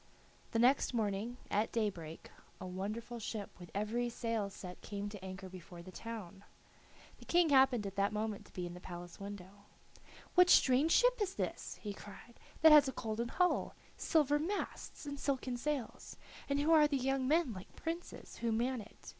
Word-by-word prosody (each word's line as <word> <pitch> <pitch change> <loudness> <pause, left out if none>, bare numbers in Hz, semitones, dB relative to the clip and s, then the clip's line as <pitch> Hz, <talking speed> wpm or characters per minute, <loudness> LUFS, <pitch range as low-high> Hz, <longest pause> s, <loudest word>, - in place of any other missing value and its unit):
The - - -1
next 250 +2 +4
morning, 220 +2 -1
at 210 +2 +1
daybreak, 180 -8 -3 0.3
a - - -6
wonderful 215 +6 -4
ship 215 -1 -5
with 175 -1 -10
every 230 +4 0
sail 230 -3 -2
set 180 -2 -9
came 205 -1 -4
to 205 -2 -9
anchor 190 0 -7
before 180 -1 -10
the 185 - -10
town. 200 -3 -8 0.8
The - - -13
King 345 -2 +4
happened 265 -5 +5
at 195 0 -6
that 200 0 +2
moment 215 -1 -3
to - - -20
be 180 - -3
at 175 - -6
the 180 - -9
palace 175 -1 -9
window. 200 0 -9 0.7
"What 360 0 +6
strange 275 +3 +5
ship - - +4
is 390 -1 -1
this," - - -3
he 205 -2 -3
cried, 205 +4 -12 0.2
"that 320 - +10
has 295 -2 +9
a 265 - -2
golden 225 +1 -3
hull, 360 +8 +1 0.2
silver 295 -3 +2
masts, 355 -1 -4
and 285 -1 -5
silken 265 -3 -1
sails, 270 -1 -4 0.3
and 280 0 +1
who 300 +3 +2
are 310 -2 +7
the 285 -2 0
young 265 0 0
men 310 -4 +3
like 185 -1 -11
princes 335 +2 -6
who 235 -1 -1
man 240 +2 0
it? 210 - -13
230 Hz, 180 wpm, -35 LUFS, 200-280 Hz, 0.8 s, that